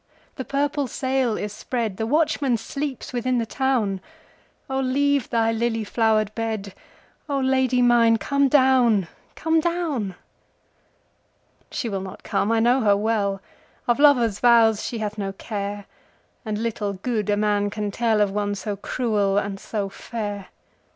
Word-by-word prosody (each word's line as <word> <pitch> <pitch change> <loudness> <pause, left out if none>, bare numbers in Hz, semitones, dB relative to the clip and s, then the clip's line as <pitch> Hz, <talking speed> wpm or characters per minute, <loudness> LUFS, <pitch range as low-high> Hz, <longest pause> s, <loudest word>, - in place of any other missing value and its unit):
the 260 - -4
purple 280 +1 -1
sail 260 -2 0
is 210 0 -4
spread, 225 -6 -3
The 220 - -2
watchman 285 -3 +2
sleeps 275 +3 -5
within 250 +1 0
the 230 - 0
town,O 265 +3 -3
leave 280 +1 +1
thy 225 -1 +2
lily 225 0 -1
flowered 215 -1 +1
bed,O 225 +6 -6
Lady 260 -1 +2
mine 235 -2 +5
come 280 +3 +1
down, 255 - +4 0.3
come 320 0 +1
down! 310 - -1 1.5
She 240 - -3
will 195 -3 -3
not 190 -1 -9
come, 210 - 0
I 230 - +3
know 245 +3 +3
her 205 -3 +4
well, 205 -2 0 0.5
Of 240 +2 +2
lover's 245 -8 +4
vows 230 -3 +5
she 235 - -4
hath 215 -1 -4
no 195 -1 -3
care, 205 0 -5 0.6
And 215 -3 -3
little 215 -2 -2
good 210 +2 -2
a 205 - +2
man 205 -1 +1
can 205 0 -3
tellOf 215 -2 +1
one 205 0 -1
so 205 +1 -4
cruel 205 -1 0
and 200 -1 -2
so 205 -1 -3
fair. 205 -1 -6
225 Hz, 145 wpm, -23 LUFS, 205-260 Hz, 1.5 s, mine